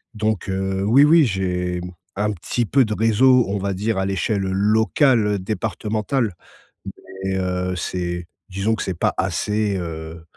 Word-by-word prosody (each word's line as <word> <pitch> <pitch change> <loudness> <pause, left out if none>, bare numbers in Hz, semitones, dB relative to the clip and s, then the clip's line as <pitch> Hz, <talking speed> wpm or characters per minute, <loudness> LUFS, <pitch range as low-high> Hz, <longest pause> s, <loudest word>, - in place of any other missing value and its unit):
donc 110 -2 -1
heu, 95 0 -1
oui, 120 +8 +5
oui, 160 0 +6
j'ai, 90 -4 -2
mmh, 90 - -7 0.3
un 105 +1 +1
petit 105 +6 -2
peu 130 +4 +3
de 110 - -3
réseau. 115 +3 +4
On 100 - -1
va 100 0 -2
dire 105 +3 -1
à 95 - 0
l'échelle 100 +1 -1
locale, 105 +3 +2
départementale 110 +3 -2 0.9
mais 95 0 -1
heu, 90 0 -1
c'est 85 -1 -3 0.2
disons 100 +4 0
que - - -4
c'est 95 - -2
pas - - +1
assez, 105 -1 0
heu, 80 -1 -6
100 Hz, 155 wpm, -21 LUFS, 90-110 Hz, 0.9 s, oui